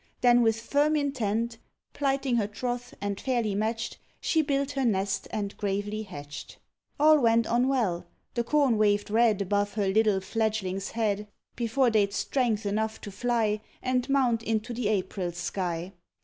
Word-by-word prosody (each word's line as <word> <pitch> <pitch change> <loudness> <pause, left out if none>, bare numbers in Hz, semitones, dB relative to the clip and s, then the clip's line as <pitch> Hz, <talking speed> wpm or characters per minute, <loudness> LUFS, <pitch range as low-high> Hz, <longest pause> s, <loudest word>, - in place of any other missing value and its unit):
Then 245 -1 +6
with 225 -1 +2
firm 290 +6 +2
intent 235 -5 -1 0.3
Plighting 270 -3 0
her 210 -3 +1
troth, 245 +3 -4
and 200 -1 -3
fairly 240 -6 0
matched, 225 +3 -2 0.2
She 320 - +2
built 280 -1 0
her 275 -2 -1
nest 195 -4 0
and 205 -2 -3
gravely 205 +1 -2
hatched. 145 -8 -9 0.4
All 305 +1 +6
went 230 -2 +4
on 240 +3 +2
well, 195 -10 0 0.3
the 235 - 0
corn 260 -3 +2
waved 205 -1 +2
red 220 -3 +3
Above 205 +2 -1
each 195 -2 +1
little 215 -2 +3
fledgling's 200 -1 -2
head, 210 -2 0 0.3
Before 240 +2 +2
they'd 205 -2 +2
strength 230 -5 0
enough 220 +2 -1
to 205 - -7
fly, 215 0 0 0.2
And 255 0 0
mount 255 -5 +2
into 225 +1 -2
the 235 -2 -1
April 190 -3 -1
sky. 175 +1 -3
220 Hz, 155 wpm, -28 LUFS, 205-245 Hz, 0.4 s, Then